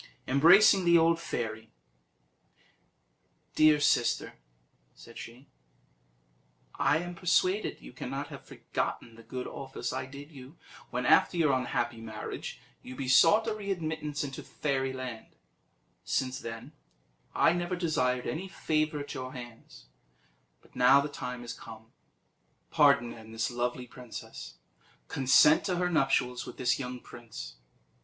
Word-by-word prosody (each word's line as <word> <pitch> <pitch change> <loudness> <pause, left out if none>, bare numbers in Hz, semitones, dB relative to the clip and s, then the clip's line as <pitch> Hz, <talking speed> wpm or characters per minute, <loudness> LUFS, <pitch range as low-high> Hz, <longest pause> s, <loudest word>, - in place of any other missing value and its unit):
Embracing 180 +8 +6
the 170 -1 +6
old 165 0 +3
fairy, 110 -6 -4 1.8
"Dear 155 -1 +5
sister," 120 -4 +1 0.6
said - - -12
she, 120 +4 -11 1.3
"I 150 - +2
am 175 +2 -5
persuaded 185 +3 +1
you - - -12
cannot - - -5
have - - -10
forgotten 115 - -4
the 115 - -14
good 125 +2 -6
office 135 -1 -5
I 130 - -4
did 140 +3 -11
you 135 +2 -13 0.3
when, - - -3
after 175 - +4
your 155 -5 +3
unhappy 120 -2 -1
marriage, 110 -1 -7 0.2
you 130 - -9
besought 140 - +5
a 225 - -1
readmittance 160 -8 -3
into 135 -2 -6
Fairyland; 130 -4 -4 0.7
since 130 0 -1
then 115 +4 -8 0.6
I 165 - +4
never 175 +1 -2
desired 125 -8 0
any 175 +5 -3
favour 155 -4 -1
at 145 - -7
your 130 0 -6
hands, 120 - -11 0.8
but - - -24
now 125 +3 +6
the 145 +1 -2
time 125 -3 -6
is 120 0 -6
come. 115 -1 -12 0.8
Pardon, 120 0 +4
then, 110 -1 -12
this 115 +2 -2
lovely 120 +1 -2
princess; 125 -1 -10 0.5
consent 135 +3 +5
to 185 - 0
her 180 0 0
nuptials 135 -5 +1
with - - -9
this 125 +1 +1
young 125 -1 -5
prince. - - -10
130 Hz, 130 wpm, -29 LUFS, 120-160 Hz, 1.8 s, Embracing